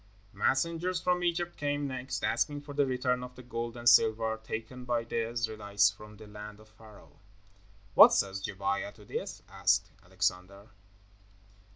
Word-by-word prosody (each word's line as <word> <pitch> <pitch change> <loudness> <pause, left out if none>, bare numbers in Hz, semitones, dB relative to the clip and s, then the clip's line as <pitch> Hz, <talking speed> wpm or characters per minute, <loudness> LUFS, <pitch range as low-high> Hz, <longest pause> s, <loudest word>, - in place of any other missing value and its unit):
Messengers 170 +5 0
from 180 +1 0
Egypt 175 0 -1
came 145 0 -1
next, 130 -1 -4
asking 140 +6 0
for 145 0 -9
the 140 -1 +2
return 125 -1 0
of 125 0 -9
the 125 - -11
gold 115 0 -5
and 120 0 -4
silver 110 -1 +5
taken 115 +3 -6
by 120 -1 0
the 115 0 -2
Israelites 105 -3 +1
from 105 +1 -13
the 110 - -12
land 105 0 -10
of 110 0 -18
Pharaoh. 110 -1 -17 0.7
"What - - +10
says 95 0 0
Gebiah 100 0 -2
to 105 - -16
this?" - - -5
asked - - +1
Alexander. 95 +2 -3
115 Hz, 155 wpm, -30 LUFS, 105-130 Hz, 0.7 s, What